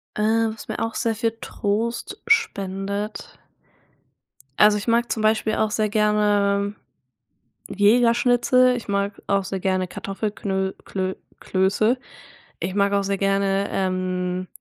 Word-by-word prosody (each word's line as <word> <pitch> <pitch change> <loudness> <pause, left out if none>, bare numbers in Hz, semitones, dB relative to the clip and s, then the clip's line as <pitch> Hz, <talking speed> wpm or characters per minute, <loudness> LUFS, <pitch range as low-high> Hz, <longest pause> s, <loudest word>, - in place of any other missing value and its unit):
Äh, 210 - -2 0.3
was 220 - -11
mir - - -4
auch 225 0 -2
sehr 230 -2 0
viel 225 +1 -1
Trost 225 +3 -3
spendet. 200 - -1 1.2
Also, 210 0 +6
ich 205 - -6
mag 235 +1 +2
zum 220 - -1
Beispiel 215 0 +2
auch 215 -1 0
sehr 215 -1 0
gerne 205 -1 +2 0.9
Jägerschnitzel, 245 +4 +4
ich 235 - -8
mag 200 0 -2
auch 195 -1 +2
sehr 190 0 -4
gerne 185 -1 0
Kartoffelknöl 195 -1 -3
Klö 190 -1 -3 0.2
Klöße. 200 +6 +1 0.6
Ich 185 +3 -3
mag 200 0 +2
auch 200 - +2
sehr 195 0 -1
gerne, 195 0 +1
ähm 185 -1 -1
205 Hz, 125 wpm, -23 LUFS, 195-220 Hz, 1.2 s, Also